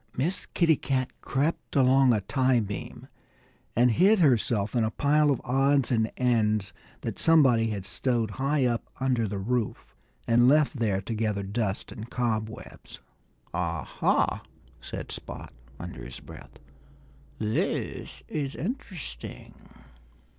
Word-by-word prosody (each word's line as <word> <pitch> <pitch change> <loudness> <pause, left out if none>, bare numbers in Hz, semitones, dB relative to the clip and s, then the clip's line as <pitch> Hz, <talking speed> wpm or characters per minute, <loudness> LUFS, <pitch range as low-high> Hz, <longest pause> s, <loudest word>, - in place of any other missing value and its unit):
Miss 165 +9 -1
Kitty 165 -4 +4
Cat 130 -1 -1
crept 145 +5 -1
along 135 -1 +5
a 110 -3 +2
tiebeam 120 -4 -1 0.7
and 120 +1 +4
hid 195 - +5
herself 120 - +2
in 120 - +3
a 110 - +1
pile 150 +5 +2
of 135 - +1
odds 135 +1 +2
and 110 -2 +1
ends 110 -5 +1 0.3
that - - -5
somebody 130 -9 +4
had 100 -3 -4
stowed 120 -3 -1
high 140 0 +2
up 120 -2 0 0.2
under 125 -4 +1
the 100 0 -4
roof 115 +3 -2 0.3
and 120 +1 +5
left 150 -1 +3
there 100 -4 +1
to 115 - -5
gather 105 -2 -1
dust 100 0 -2
and 110 +2 -8
cob 110 -3 -1
webs. 110 - -11 0.6
"Ah, - - -2
ha!" - - +1 0.4
said - - -7
Spot - - -7 0.3
under 90 -7 -7
his 60 +1 -9
breath. - - -13 0.8
"This 110 0 -2
is 140 -3 -3
interesting." 180 - -6
120 Hz, 130 wpm, -27 LUFS, 110-135 Hz, 0.8 s, along